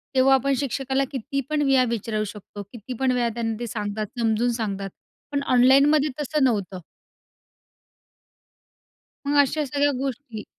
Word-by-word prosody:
तेव्हा 260 +1 +5
आपण 275 +1 +1
शिक्षकाला 270 0 -1
किती 275 +1 -3
पण 305 -1 0
वेळा 270 -2 +4
विचारू 215 0 -3
शकतो 205 0 -10
किती 240 +1 -8
पण 265 -1 +2
वेळा 245 -2 +1
त्यांना 225 -1 -2
ते 240 - -4
सांगतात, 210 0 -3
समजून 230 +1 +1
सांगतात. 200 -2 -3 0.4
पण 280 -1 -1
ऑनलाईनमध्ये 275 +4 +5
तसं 295 0 0
नव्हतं. 200 -7 0 2.5
मग 290 - +1
अशा 295 +2 +1
सगळ्या 285 +1 +1
गोष्टी 260 -5 -5
255 Hz, 135 wpm, -24 LUFS, 220-275 Hz, 2.5 s, तेव्हा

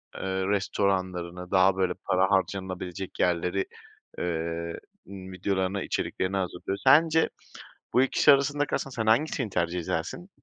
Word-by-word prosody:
eee, - - -7 0.3
restoranlarını, 95 -3 -1
daha 95 0 +5
böyle 95 -2 +1
para 95 +1 +2
harcanılabilecek 95 -1 -2
yerleri, 90 +2 +1 0.5
eee, 85 0 -3 0.3
videolarını, 95 0 -2
içeriklerini 95 +1 -2
hazırlıyor. 95 +1 -3
Sence 160 +4 +5 0.6
bu 125 - +5
ikisi 135 +2 +5
arasında 145 +1 +1
kalsan 135 - -3
sen 110 -3 -3
hangisini 125 0 +2
tercih 85 -1 -1
edersin? 90 - -4
95 Hz, 115 wpm, -27 LUFS, 90-105 Hz, 0.6 s, daha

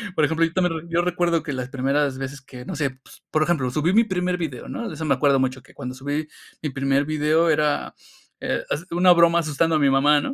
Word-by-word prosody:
por 155 - +3
ejemplo, 160 +2 +2
yo 165 - -5
también, 170 -3 -1
yo 170 +1 +2
recuerdo 175 -1 +1
que 145 - -4
las 130 0 -4
primeras 135 +1 0
veces 135 +1 -6
que, 125 -2 -11
no 185 - -5
sé, 145 -3 -1
pues, - - -17
por 155 0 +2
ejemplo, 155 -7 0
subí 155 +7 +1
mi 230 - +6
primer 180 -4 -1
video, 150 -8 -5
¿no?, 235 -4 -4
de - - -7
eso 160 - -5
me 140 - +3
acuerdo 140 +1 +3
mucho, 130 0 -1
que - - -20
cuando 125 +1 -7
subí 145 +3 -3 0.3
mi 150 - -2
primer 135 +1 0
video 155 +2 +2
era, 150 -1 0 0.5
eh, - - -2
es 160 +5 -2
una 180 +1 +5
broma 170 0 +4
asustando 160 +1 +1
a 155 - +2
mi 140 - +4
mamá, 145 +2 +4
¿no?, 270 - -3
150 Hz, 245 wpm, -23 LUFS, 135-170 Hz, 0.5 s, mi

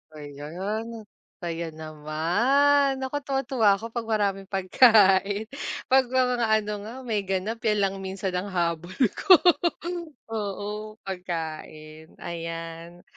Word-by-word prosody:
Ayan, 185 +11 -6 0.4
kaya 170 0 -3
naman 180 - +2
naku 275 +2 -2
tuwa 270 -1 +1
tuwa 240 -4 +1
ako 230 +4 -8
'pag 235 -2 -4
maraming 200 -3 0
pagkain 200 0 +4 0.5
'pag 265 0 +6
may 260 0 +3
mga 240 -2 0
ano 215 -1 +1
nga 215 +3 -8
may 215 -3 0
ganap 195 +4 -2
'yan 215 -2 +1
lang 195 0 0
minsan 190 0 -3
ang 180 +2 -2
habol 175 0 -2 0.2
ko 375 - +7 1.0
oo 210 0 -4
pagkain, 160 -3 -6
ayan, 165 0 -7
195 Hz, 120 wpm, -26 LUFS, 170-225 Hz, 1.0 s, ko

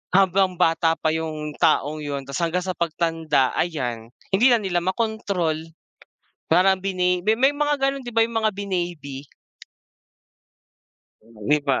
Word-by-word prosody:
habang 190 -1 +3
bata 165 -1 +2
pa 160 -1 0
yung 155 -1 -3
taong 150 +2 +2
yun 145 -2 -4
tapos 140 +3 -5
hanggang 170 +2 0
sa 185 - -2
pagtanda, 165 -5 0
ayan 125 -9 -2 0.2
hindi 205 +6 +4
na 245 - +6
nila 180 -2 0
makontrol 185 -4 -1 0.9
parang 185 +3 +4
bini 180 -1 0
may 220 - +5
may 265 +4 +4
mga 295 0 0
gano'n 275 -1 0
'di 240 - -7
ba 230 - +5
yung 230 0 0
mga 220 -1 +2
binaby? 175 -8 -4 2.0
'Di 115 +6 -1
ba? 135 -2 +2
175 Hz, 140 wpm, -23 LUFS, 155-195 Hz, 2.0 s, na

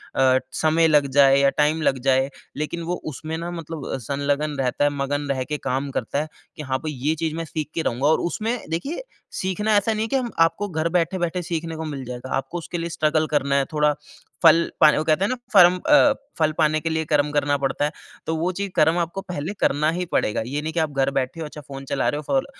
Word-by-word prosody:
अ, 130 -1 +4
समय 160 +1 +3
लग 150 -2 +4
जाए 135 0 +7
या 140 0 +5
टाइम 155 +2 +2
लग 135 -3 +1
जाए 130 +1 +3 0.3
लेकिन 160 +3 -3
वो 175 +2 -2 0.2
उसमें 160 +4 -5
ना 170 +1 -5
मतलब 165 -3 -6
अ, - - -1
संलगन 145 +4 -1
रहता 130 +2 0
है - - +4
मगन 145 +1 -1
रहके 135 +3 -2
काम 135 +2 -1
करता 140 +6 -2
है 155 - -4 0.3
कि 155 - -7
हाँ 130 -1 -1
भई, 155 - -1
ये 145 +4 -1
चीज़ 160 0 -2
मैं 165 0 -3
सीख 155 -1 -4
के 165 - 0
रहूँगा 130 +1 0
और 160 - +4
उसमें 220 +7 -1
देखिए 275 - -3 0.4
सीखना 210 +3 0
ऐसा 220 +2 +1
नहीं 215 +1 -1
है - - -2
कि - - 0
हम 250 -3 -1
आपको 180 +5 +2
घर 160 0 -1
बैठे-बैठे 175 0 0
सीखने 165 -1 -3
को 160 - -4
मिल 140 -3 -5
जाएगा। 125 +1 -7
आपको 135 +6 -4
उसके 170 +1 -5
लिए 170 0 -3
स्ट्रगल 155 -1 +1
करना 140 -2 +1
है, 140 -1 +2
थोड़ा 150 -1 +3 0.5
फल 165 +1 +7 0.2
पा 155 - +9
वो 155 - +1
कहते 160 +4 +2
है - - -1
ना? 255 - 0 0.2
फरम 180 -1 +7
अ, 290 -1 +7 0.3
फल 155 -1 +3
पाने 155 0 +3
के 165 - -2
लिए 160 0 -1
कर्म 150 -1 +1
करना 145 -1 +1
पड़ता 140 +1 -1
है। 150 - -1 0.4
तो 160 - 0
वो 170 +3 0
चीज़ 200 +2 -3
कर्म 160 +2 +4
आपको 170 +3 -2
पहले 180 -1 -5
करना 150 +2 +2
ही 180 +2 -2
पड़ेगा। 105 - +1
ये 145 +3 -2
नहीं 160 +1 -4
कि 170 - 0
आप 155 -2 0
घर 135 -1 +1
बैठे 135 +5 -2
हो 160 - -3
अच्छा 150 0 -9
फ़ोन 135 -1 -9
चला 135 - -1
रहे 145 - -2
हो 150 - -5
फ़ोल 270 0 +1
155 Hz, 245 wpm, -23 LUFS, 140-170 Hz, 0.5 s, पा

